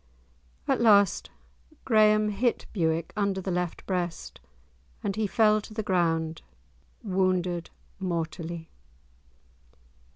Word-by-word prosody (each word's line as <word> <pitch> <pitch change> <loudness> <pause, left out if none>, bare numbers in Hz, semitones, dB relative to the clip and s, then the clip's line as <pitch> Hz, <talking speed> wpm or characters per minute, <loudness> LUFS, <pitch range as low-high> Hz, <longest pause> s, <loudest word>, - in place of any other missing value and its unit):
At - - +1
last 205 -5 +4 0.6
Graeme 215 -2 +4
hit 225 +4 0
Bewick 165 -4 0
under 200 -2 0
the 190 0 -3
left 180 -1 -3
breast, 175 -3 -3 0.6
and 200 - -1
he 215 -1 0
fell 215 0 +3
to 215 - -12
the 220 - -2
ground 165 -4 0 0.6
wounded 185 -3 0 0.3
mortally. 170 -2 -4
185 Hz, 100 wpm, -27 LUFS, 170-210 Hz, 0.6 s, last